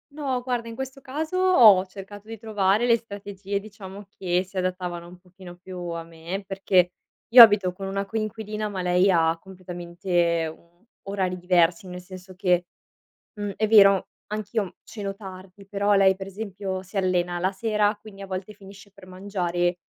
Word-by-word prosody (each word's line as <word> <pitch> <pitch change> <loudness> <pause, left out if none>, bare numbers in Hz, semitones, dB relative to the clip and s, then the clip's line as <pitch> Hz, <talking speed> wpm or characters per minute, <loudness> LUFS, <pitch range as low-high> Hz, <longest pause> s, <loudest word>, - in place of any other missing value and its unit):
No, 275 -4 -2
guarda 245 -2 -3
in 230 - -7
questo 265 +2 -6
caso, 310 +7 -4
ho 235 - +6
cercato 200 +2 -11
di 225 0 -7
trovare 210 0 +1
le 235 -1 +4
strategie 200 -2 -6
diciamo 200 -1 -11
che 180 -1 0
si 190 +1 -12
adattavano 180 -2 -3
un 180 +1 -13
pochino 180 0 -14
più 185 +1 -10
a 165 0 -4
me, 165 +4 -7
perché 190 -2 +2 0.4
io 240 +1 +11
abito 205 -5 +7
con 195 +2 -7
una 195 +1 -2
coinquilina, 215 0 -4
ma 195 -3 -4
lei 180 +2 +3
ha 165 -2 +3
completamente, 175 -2 -2
mhmm, 170 +4 -26 0.2
orari 190 -2 -2
diversi, 175 0 +2
nel 180 0 -7
senso 185 0 -12
che 180 -2 +1 0.7
mhmm, 205 -1 -4
è 215 - +1
vero 195 -3 +6 0.2
anch'io 210 -1 -3
ceno 205 -3 -5
tardi, 190 0 -11
però 200 +1 +1
lei 195 -1 +5
per 190 0 -8
esempio 195 -2 -5
si 190 +3 -12
allena 180 -2 0
la 185 +2 +1
sera, 210 +1 0
quindi 200 -2 -12
a - - -7
volte 190 +2 -5
finisce 200 0 -15
per 200 -2 -16
mangiare 180 -2 -2
195 Hz, 170 wpm, -25 LUFS, 180-210 Hz, 0.7 s, io